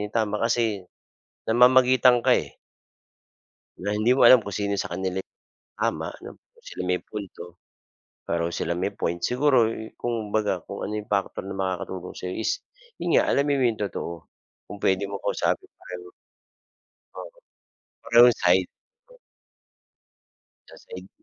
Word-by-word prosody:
'yung 105 Hz, -, -6 dB
tama 105 Hz, -2 st, 0 dB
kasi 115 Hz, -5 st, 0 dB, 0.6 s
namamagitan 125 Hz, +1 st, +5 dB
ka, -, -, +4 dB
eh. -, -, -6 dB, 1.2 s
Na 100 Hz, +3 st, -2 dB
hindi 110 Hz, +4 st, +3 dB
mo 130 Hz, -, +1 dB
alam 125 Hz, -3 st, +8 dB
kung 100 Hz, -, -6 dB
sino 100 Hz, 0 st, -1 dB
sa -, -, -4 dB
kanila 95 Hz, -1 st, -3 dB
'yung -, -, -72 dB, 0.4 s
tama -, -, -1 dB
'no, -, -, -11 dB, 0.2 s
kung -, -, -26 dB
sino -, -, -6 dB
may 90 Hz, 0 st, 0 dB
punto, 90 Hz, -4 st, -9 dB, 0.7 s
pareho 85 Hz, 0 st, -2 dB
silang 85 Hz, -, -2 dB
may 100 Hz, -, -2 dB
point. 85 Hz, +1 st, -2 dB
Siguro 125 Hz, +4 st, +3 dB, 0.3 s
kumbaga 110 Hz, -5 st, -2 dB
kung 100 Hz, -, -6 dB
ano 105 Hz, -, -5 dB
'yung 105 Hz, 0 st, -6 dB
factor 100 Hz, -2 st, -1 dB
na 95 Hz, 0 st, -7 dB
makakatulong 95 Hz, -1 st, -4 dB
sa'yo 90 Hz, 0 st, -5 dB
is 110 Hz, -, -1 dB, 0.4 s
'yun -, -, +3 dB
nga, -, -, +2 dB
alamin 140 Hz, 0 st, +1 dB
mo 130 Hz, -, +2 dB
'yong 110 Hz, -3 st, -1 dB
totoo, 85 Hz, -, -5 dB, 0.6 s
kung 105 Hz, -, -7 dB
puwede 95 Hz, 0 st, +1 dB
mong 100 Hz, -, -6 dB
kausapin -, -, -1 dB
pareho. 90 Hz, 0 st, -10 dB, 1.0 s
Oo, -, -, -8 dB, 0.8 s
parehong 120 Hz, +1 st, +6 dB
side. 90 Hz, +1 st, +3 dB, 2.0 s
Kaseng. 475 Hz, -2 st, -12 dB
105 Hz, 140 wpm, -25 LUFS, 95-120 Hz, 2.0 s, alam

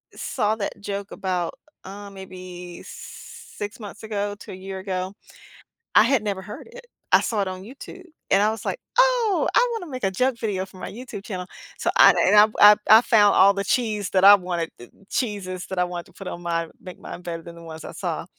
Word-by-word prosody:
saw 215 Hz, -3 st, -1 dB
that 200 Hz, -1 st, -4 dB
joke 200 Hz, 0 st, -5 dB
about, 180 Hz, -3 st, -2 dB, 0.3 s
uh, 200 Hz, +1 st, -9 dB
maybe 185 Hz, -2 st, -10 dB
6 205 Hz, +2 st, -9 dB
months 210 Hz, 0 st, -10 dB
ago 205 Hz, -1 st, -3 dB
to -, -, -10 dB
a -, -, -7 dB
year 190 Hz, 0 st, -7 dB
ago, 185 Hz, 0 st, -4 dB, 0.8 s
I -, -, +8 dB
had 235 Hz, -1 st, +2 dB
never 200 Hz, -2 st, -2 dB
heard 210 Hz, -, -10 dB
it. -, -, -13 dB, 0.3 s
I -, -, +7 dB
saw 215 Hz, -3 st, -1 dB
it 195 Hz, -, -1 dB
on 185 Hz, 0 st, -6 dB
YouTube, 280 Hz, -, -11 dB, 0.3 s
and 195 Hz, -, +5 dB
I 210 Hz, -, +4 dB
was 220 Hz, -, -6 dB
like, -, -, -2 dB, 0.2 s
"Oh, -, -, +3 dB
I -, -, +4 dB
want 450 Hz, -5 st, -4 dB
to -, -, -11 dB
make 255 Hz, -2 st, -6 dB
a 190 Hz, -, +1 dB
joke 255 Hz, +4 st, 0 dB
video 200 Hz, -5 st, -2 dB
for 190 Hz, -, -16 dB
my -, -, -6 dB
YouTube 235 Hz, -4 st, -8 dB
channel,” 185 Hz, -3 st, -5 dB, 0.3 s
so -, -, -1 dB
I -, -, +9 dB
and 210 Hz, -, +4 dB, 0.2 s
I 205 Hz, 0 st, +10 dB
I -, -, -1 dB
I 220 Hz, +2 st, +9 dB
found 210 Hz, -4 st, +4 dB
all 195 Hz, +1 st, +6 dB
the 200 Hz, 0 st, -3 dB
cheese 210 Hz, -4 st, 0 dB
that 190 Hz, 0 st, +2 dB
I 200 Hz, +1 st, +10 dB
wanted 175 Hz, -3 st, -3 dB
the 120 Hz, -, -13 dB, 0.2 s
cheeses 195 Hz, -6 st, -3 dB
that 190 Hz, -, -6 dB
I 180 Hz, -, +4 dB
wanted 175 Hz, -1 st, -6 dB
to 190 Hz, -, -21 dB
put 190 Hz, +1 st, -9 dB
on 175 Hz, -, -7 dB
mine, 165 Hz, -1 st, -2 dB
make 185 Hz, -1 st, -10 dB
mine 175 Hz, -, -9 dB
better 170 Hz, -1 st, -5 dB
than 170 Hz, 0 st, -11 dB
the 170 Hz, -, -12 dB
ones 160 Hz, -1 st, -9 dB
I -, -, -7 dB
saw. -, -, -4 dB
200 Hz, 225 wpm, -23 LUFS, 185-215 Hz, 0.8 s, I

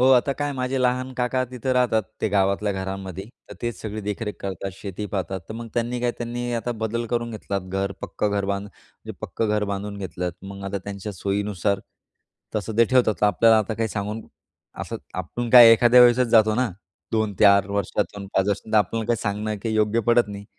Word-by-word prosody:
हो, 125 Hz, -, +5 dB
आता 130 Hz, +2 st, +4 dB
काय 145 Hz, +1 st, -3 dB
माझे 130 Hz, 0 st, -2 dB
लहान 130 Hz, +1 st, 0 dB
काका 130 Hz, +1 st, 0 dB
तिथं 130 Hz, +1 st, -3 dB
राहतात, 125 Hz, -3 st, +2 dB, 0.2 s
ते 110 Hz, -, +1 dB
गावातल्या 100 Hz, +1 st, +1 dB
घरांमध्ये, 95 Hz, -1 st, -5 dB, 0.3 s
तर -, -, -8 dB
तेच 120 Hz, -6 st, -3 dB
सगळे 110 Hz, 0 st, -5 dB
देखरेख 105 Hz, +1 st, -4 dB
करतात, 95 Hz, 0 st, -4 dB
शेती 100 Hz, +1 st, -6 dB
पाहतात, 95 Hz, 0 st, -2 dB
तर 110 Hz, -, -6 dB
मग 115 Hz, 0 st, -7 dB
त्यांनी 120 Hz, +1 st, -1 dB
काय 120 Hz, 0 st, +1 dB
त्यांनी 120 Hz, +1 st, -3 dB
आता 120 Hz, +1 st, -2 dB
बदल 115 Hz, +2 st, -1 dB
करून 120 Hz, 0 st, -2 dB
घेतलात, 100 Hz, -2 st, -3 dB
घर, 95 Hz, +1 st, -2 dB
पक्कं 105 Hz, -, -2 dB
घर 100 Hz, -1 st, 0 dB
बांधू 100 Hz, +1 st, -2 dB
म्हणजे -, -, -13 dB
पक्कं 110 Hz, -, -2 dB
घर 105 Hz, 0 st, +1 dB
बांधून 100 Hz, +1 st, -4 dB
घेतलंत. 90 Hz, -2 st, -4 dB
मग 100 Hz, 0 st, -8 dB
आता 100 Hz, 0 st, -3 dB
त्यांच्या 100 Hz, +1 st, -6 dB
सोयीनुसार 100 Hz, 0 st, -1 dB, 0.8 s
तसं 105 Hz, +1 st, -3 dB
ते 115 Hz, -, +7 dB
ठेवतात. 125 Hz, -3 st, +3 dB
तर 105 Hz, -, +5 dB
आपल्याला 110 Hz, +2 st, +5 dB
आता 110 Hz, +1 st, -1 dB
काही 115 Hz, 0 st, -1 dB
सांगून 105 Hz, +3 st, -4 dB, 0.6 s
असं -, -, -4 dB, 0.2 s
आपण 120 Hz, -1 st, -4 dB
काय 120 Hz, -2 st, +10 dB
एखाद्या 120 Hz, +2 st, +6 dB
वेळेसच 125 Hz, 0 st, +6 dB
जातो 110 Hz, -2 st, +5 dB
ना 125 Hz, 0 st, +1 dB, 0.4 s
2-4 100 Hz, -2 st, +4 dB
वर्षातून, 100 Hz, 0 st, -2 dB
5 95 Hz, +1 st, +2 dB
वर्ष, 100 Hz, -, +1 dB
तर 110 Hz, -, +1 dB
आपल्याला 110 Hz, +1 st, 0 dB
काही 120 Hz, -1 st, +2 dB
सांगणं 105 Hz, +1 st, -2 dB
काही 110 Hz, -1 st, -1 dB
योग्य 110 Hz, +1 st, +2 dB
पडत 120 Hz, -3 st, +4 dB
नाही. 100 Hz, 0 st, -7 dB
105 Hz, 195 wpm, -24 LUFS, 100-120 Hz, 0.8 s, काय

